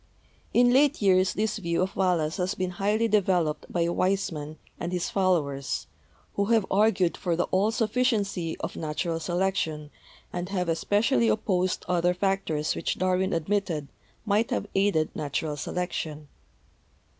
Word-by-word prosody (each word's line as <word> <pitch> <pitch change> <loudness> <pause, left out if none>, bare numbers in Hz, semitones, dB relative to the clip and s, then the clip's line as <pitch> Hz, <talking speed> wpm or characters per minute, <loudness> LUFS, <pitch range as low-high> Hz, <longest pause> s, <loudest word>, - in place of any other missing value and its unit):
In 245 0 +4
late 285 +2 +4
years 190 -2 +3
this 215 +1 -1
view 170 -1 0
of 190 - -4
Wal 185 -2 +2
lace's 155 0 -2
has 185 +1 -1
been 185 -1 -2
highly 210 +5 +1
developed 180 -7 +1
by 170 -1 +1
Weismann 170 -4 -1 0.2
and 170 - -3
his 180 -1 -2
followers, 150 -8 0 0.5
who 200 - 0
have 225 -2 +3
argued 195 -3 +3
for 175 -2 -1
the 175 - +1
all 195 +3 +3
sufficiency 215 -7 0
of - - -4
natu 155 +2 -3
ral 165 - -1
selection, 165 -4 -1 0.4
and 180 +1 -3
have 180 -3 -1
especially 165 - +2
opposed 180 - 0
other 180 0 +2
factors 185 -5 0
which - - -2
Darwin 185 +1 +1
admitted 165 -3 -1 0.4
might 215 +2 +2
have - - -1
aided 195 -5 +1
natural 150 0 -2
selec 180 +5 -3
tion. 150 -1 -5
180 Hz, 150 wpm, -27 LUFS, 165-200 Hz, 0.5 s, In